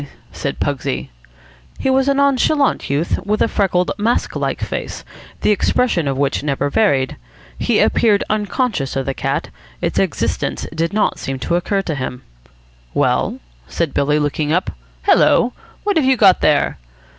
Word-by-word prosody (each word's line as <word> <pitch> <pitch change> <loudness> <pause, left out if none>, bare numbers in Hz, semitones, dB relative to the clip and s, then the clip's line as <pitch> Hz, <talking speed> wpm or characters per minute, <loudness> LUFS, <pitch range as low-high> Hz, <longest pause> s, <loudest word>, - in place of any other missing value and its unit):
said - - -4
Pugsy. 65 +1 -2 0.7
He 265 - 0
was 265 +1 +2
a 280 - +3
nonchalant 280 +1 +2
youth, 145 +5 0
with 210 +2 0
a - - +3
freckled, 180 -4 +1
mask 230 +4 0
like - - -2
face, - - -5 0.4
the - - +3
expression 205 - +1
of 135 -1 -1
which 140 0 0
never 145 0 -1
varied. 140 -12 +2 0.4
He - - +1
appeared 210 -3 +3
unconscious 210 - -1
of 135 -1 -1
the 135 - -1
cat. - - -2 0.3
Its - - -1
existence - - -1
did 165 +1 -1
not 210 0 0
seem 135 0 -4
to 170 - +1
occur 195 +3 0
to 165 - -2
him. 130 -2 -5 0.7
"Well?" - - +1 0.3
said 170 -4 -2
Billy, 150 +1 +2
looking 150 0 -1
up. 180 +3 +1 0.3
"Hello, 245 +1 +4 0.3
what 410 -4 +1
have 300 - +3
you 265 -1 +4
got 195 -5 +5
there?" 145 - +2
180 Hz, 155 wpm, -18 LUFS, 145-230 Hz, 0.7 s, got